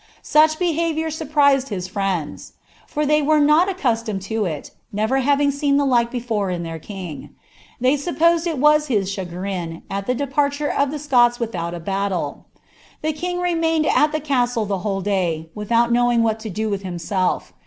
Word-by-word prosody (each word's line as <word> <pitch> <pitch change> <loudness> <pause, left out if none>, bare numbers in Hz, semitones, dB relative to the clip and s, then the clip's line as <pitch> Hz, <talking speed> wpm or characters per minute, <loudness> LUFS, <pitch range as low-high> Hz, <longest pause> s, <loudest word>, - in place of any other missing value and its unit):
Such 310 +1 +4
behaviour 325 -2 0
surprised 285 -3 +2
his 185 -4 -4
friends; 185 -5 -3 0.3
for 300 0 -1
they 300 +1 +3
were 305 +1 +3
not 300 +5 +4
■ccostomed 230 - -1
to 220 +1 -1
it, 155 -5 -5 0.2
never 220 +6 0
having 285 +1 +2
seen 280 0 +1
the 285 - +2
like 240 -3 +2
before 230 -5 -2
in 175 -1 -3
their 165 -1 -6
king. 180 -3 -8 0.4
They 255 +2 +3
EapiKised 335 +3 +1
it 325 -3 -2
was 300 +2 +4
his 200 -7 0
chagrin, 180 -2 -5
at 195 0 -3
the 250 - +1
departure 285 +2 0
of 280 0 +1
the 300 - -4
Scots 245 -5 +3
without 175 -7 -3
a - - -6
bkttle. 195 +1 -3 0.6
The 310 0 0
king 355 +3 -3
remained 330 -3 +1
at 300 0 +3
the 310 - -1
casile 245 -6 0
the 200 -2 -2
whole 195 0 -2
day, 175 -5 -1
wittiout 230 +3 +1
knowing 240 0 +3
wItBt 220 0 -1
(o - - -4
do 215 +3 -2
with 200 -1 -2
himself. 185 0 -2
240 Hz, 175 wpm, -21 LUFS, 195-300 Hz, 0.6 s, Such